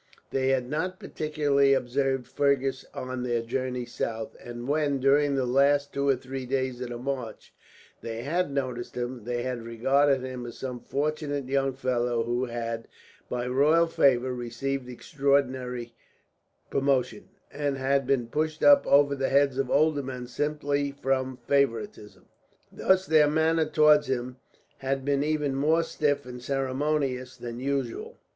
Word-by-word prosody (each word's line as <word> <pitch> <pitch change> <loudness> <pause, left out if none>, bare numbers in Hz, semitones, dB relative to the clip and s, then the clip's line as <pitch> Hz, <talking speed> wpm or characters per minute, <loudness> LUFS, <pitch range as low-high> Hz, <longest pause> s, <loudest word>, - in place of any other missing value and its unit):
They 130 -1 0
had 130 -2 +1
not 180 +7 -2
particularly 145 -3 +1
observed 135 0 0
Fergus 135 -1 0
on 130 0 -5
their 120 -2 -1
journey 125 +1 -3
south; 110 -2 -4
and 120 0 -7
when, 145 -1 +1
during 140 +2 +3
the 130 -2 +1
last 140 +3 +2
two 140 0 0
or 135 - +5
three 130 0 -6
days 130 -1 -1
of 125 - -4
the 120 - -5
march, 125 -3 -5 0.5
they 115 0 -5
had 170 +4 0
noticed 130 -3 -3
him, 120 -2 -4
they 120 0 -2
had 125 -2 -3
regarded 135 +4 +2
him 130 -2 -5
as 120 - -9
some 125 -2 -5
fortunate 145 0 -2
young 135 0 +1
fellow 120 -3 0
who 120 +2 -1
had, 115 -1 -4 0.4
by 125 0 -2
royal 145 +6 +4
favour, 130 -5 +2
received 125 +2 -4
extraordinary 130 -2 -1 0.8
promotion, 135 +7 0 0.2
and 145 -1 -1
had 135 0 +1
been 135 -3 +2
pushed 155 +5 -2
up 285 -1 +7
over 140 0 +5
the 135 -1 -1
heads 140 -1 +3
of 135 -2 0
older 155 -1 +3
men 130 -2 -6
simply 145 +1 -1
from 130 -2 -1
favouritism. 140 - -1 0.5
Thus 190 0 +2
their 155 -3 +5
manner 160 +1 +2
towards 150 -1 +5
him 125 0 -3 0.4
had 135 0 -2
been 140 0 +1
even 150 -2 0
more 155 +5 +2
stiff 145 -3 -1
and 125 -1 -8
ceremonious 135 0 -1
than 120 0 -6
usual. 135 -2 -3
135 Hz, 150 wpm, -27 LUFS, 125-145 Hz, 0.8 s, up